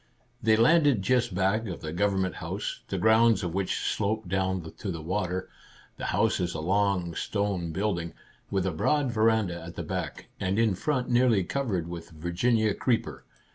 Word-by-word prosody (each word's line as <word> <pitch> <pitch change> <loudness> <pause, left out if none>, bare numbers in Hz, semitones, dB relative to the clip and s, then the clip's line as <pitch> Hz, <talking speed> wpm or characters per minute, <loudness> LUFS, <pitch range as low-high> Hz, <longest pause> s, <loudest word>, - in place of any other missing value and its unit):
They 110 -1 +4
landed 140 - +4
just 120 -2 +1
back 100 +4 +1
of 80 -3 -5
Government 95 -1 +1
House, - - -4
the - - -3
grounds 110 -2 +4
of 85 -2 -3
which 95 0 -1
sloped 110 -1 -1
down 95 -2 -1
to 100 - -4
the 85 -3 -3
water. 95 +2 -2 0.5
The - - -5
house - - +1
is 90 -3 -2
a - - -3
long, 95 0 +1
stone 95 -2 -2
build 95 +1 0
ing, 85 0 -6 0.4
with 95 -2 0
a 95 - +1
broad 135 - +1
veranda 110 -6 +2
at 85 +1 -9
the - - -4
back, - - -4
and 95 +1 0
in 115 -3 +3
front 130 +6 -1
nearly 120 -5 +4
covered 95 -6 -2
with 85 0 -7
Virginia 95 +7 +1
creeper. 120 +1 -1
95 Hz, 175 wpm, -28 LUFS, 90-110 Hz, 0.5 s, They